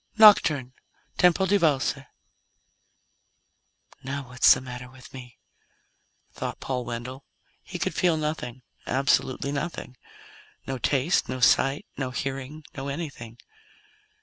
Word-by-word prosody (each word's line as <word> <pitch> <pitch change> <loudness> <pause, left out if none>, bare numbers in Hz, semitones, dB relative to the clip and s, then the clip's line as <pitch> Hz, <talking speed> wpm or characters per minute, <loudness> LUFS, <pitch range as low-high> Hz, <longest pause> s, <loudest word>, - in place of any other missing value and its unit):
NOCTURNE 155 - +6 0.5
TEMPO 180 +2 +4
DI 200 +2 +3
VALSE 150 -7 +2 2.1
"Now 140 +1 -4
what 125 -1 -13
the - - +5
hell's - - +11
the - - -6
matter 125 -1 -8
with 130 -1 -15
me?" 125 -2 -11 0.9
thought - - -5
Paul 125 -2 -3
Wendell. 120 +3 -6 0.4
He - - -7
could - - -2
feel 175 -3 +2
nothing. 150 -5 -4 0.2
Absolutely 135 +1 +1
nothing: 140 -3 -5 0.7
No 130 -1 -4
taste, 145 +7 +1
no 130 0 -3
sight, 135 +3 +3
no 135 -2 -2
hearing, 135 +4 -5
no 135 0 -5
anything. 140 -6 -6
135 Hz, 120 wpm, -26 LUFS, 125-150 Hz, 2.1 s, hell's